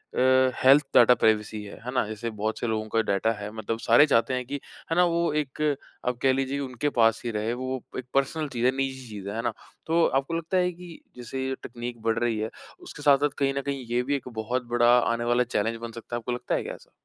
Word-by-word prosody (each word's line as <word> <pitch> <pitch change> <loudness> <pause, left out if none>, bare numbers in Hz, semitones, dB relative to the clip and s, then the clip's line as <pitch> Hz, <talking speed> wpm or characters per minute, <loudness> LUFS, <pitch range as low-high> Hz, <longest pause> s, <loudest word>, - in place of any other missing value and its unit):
अ, 130 0 +4
health 135 +3 +7
data 120 +1 +8
privacy 110 -1 +1
है। 100 - -9
है 125 - -3
ना? 125 -3 +2
जैसे 110 +2 -4
बहुत 110 0 -3
से 120 - -2
लोगों 110 -1 -1
का 115 +1 +2
डेटा 100 +3 +2
है 105 +1 -6
मतलब 110 +1 -3
सारे 120 +5 +6
चाहते 115 -3 +2
हैं 125 0 -2
कि 140 +3 -4 0.3
है - - +2
ना 180 - +5
वो 170 -1 +1
एक 150 -1 -2 0.5
आप 125 -1 0
कह 135 -1 +4
लीजिए 135 +1 -1
उनके 135 +1 -2
पास 115 -1 +4
ही 120 - -1
रहे 110 +2 -1
वो 130 +1 -4 0.2
एक 130 - -5
पर्सनल 145 +3 0
चीज़ 120 -2 -2
है 130 - +5
निजी 130 -1 -3
चीज़ 100 -2 -7
है। 100 - -5
है 115 - -1
ना? 120 -2 -1 0.3
तो 165 +1 +3
आपको 135 +4 0
लगता 165 +3 -1
है 180 0 +2
कि 175 -1 -12 0.2
जैसे 130 +2 -4
ये 135 - -2
टेकनीक 120 -1 -7
बढ़ 115 0 0
रही 120 -2 0
है 110 +1 -2 0.4
उसके - - -9
साथ-साथ 145 0 +5
कहीं 135 -1 +2
न - - 0
कहीं 140 -2 -3
ये 120 +1 +1
भी 140 +3 0
एक 135 - -5
बहुत 125 +3 -2
बड़ा 120 0 +4
आने 115 -1 0
वाला 120 +1 +3
चैलेंज 115 -1 -1
बन 115 0 -5
सकता 115 +1 -7
है - - 0
आपको 120 +1 -5
लगता 120 - -2
है - - -1
क्या - - -5
ऐसा? - - -15
125 Hz, 255 wpm, -26 LUFS, 115-135 Hz, 0.5 s, डेटा